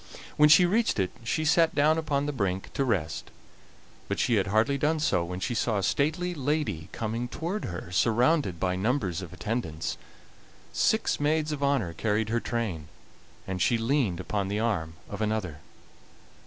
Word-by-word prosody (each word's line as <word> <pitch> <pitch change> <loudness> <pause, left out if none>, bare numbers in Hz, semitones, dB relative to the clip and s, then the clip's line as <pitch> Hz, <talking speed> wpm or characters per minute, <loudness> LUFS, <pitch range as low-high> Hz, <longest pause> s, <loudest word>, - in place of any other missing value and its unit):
When 150 0 +6
she 155 +4 +8
reached 220 +6 +1
it 95 -1 0
she 155 +7 -1
sat 165 +1 +3
down 155 +2 +4
upon 145 -3 -1
the 150 - -1
brink 95 -6 -2
to 140 - 0
rest, 90 -11 -1 0.8
but - - -2
she 120 - +1
had 100 0 +1
hardly 110 +7 +2
done 155 +3 +1
so 90 - +1
when 90 +2 -5
she 120 +6 -2
saw 115 -2 0
a 100 - -1
stately 160 - 0
lady 145 - -2
coming 115 +2 -3
toward 170 - -4
her, 90 0 -6
surrounded 115 - +2
by 90 +1 0
numbers 95 - -1
of 90 -4 -8
attendants. 85 -8 -3 0.7
Six 220 0 +1
maids 155 +1 +1
of 145 -2 -4
honor 135 -12 +1
carried 110 +4 0
her 120 +1 +1
train, 105 -12 -3 0.6
and 95 -1 -4
she 115 +6 +3
leaned 115 - 0
upon 100 +1 -2
the 100 +2 -1
arm 90 -9 -1
of - - -6
another. 105 -8 -2
115 Hz, 170 wpm, -28 LUFS, 95-150 Hz, 0.8 s, she